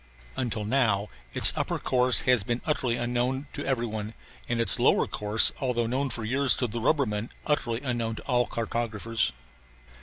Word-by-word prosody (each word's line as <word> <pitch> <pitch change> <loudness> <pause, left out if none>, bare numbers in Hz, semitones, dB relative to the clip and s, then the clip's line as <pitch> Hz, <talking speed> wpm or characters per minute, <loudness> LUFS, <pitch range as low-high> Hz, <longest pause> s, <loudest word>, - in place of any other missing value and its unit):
Until 115 -5 -3
now 105 -4 0 0.3
its - - +8
upper - - -2
course 125 -1 +2
has 125 -3 +2
been 120 +4 -2
utterly 130 -6 -1
unknown 125 +3 -2
to - - -5
every 130 -3 -1
one, 110 -1 -6 0.3
and 120 -1 -1
its 115 -5 +5
lower - - +3
course 105 +1 +2
although 125 -3 -1
known 130 +4 -2
for 115 - -4
years 135 +4 +4
to 125 - -1
the 115 0 -5
rubbermen 115 -5 0 0.2
utterly 120 -5 -1
unknown 120 -4 -2
to - - -10
all 125 -2 0
cartographers. 115 -1 -3
120 Hz, 170 wpm, -26 LUFS, 110-130 Hz, 0.3 s, its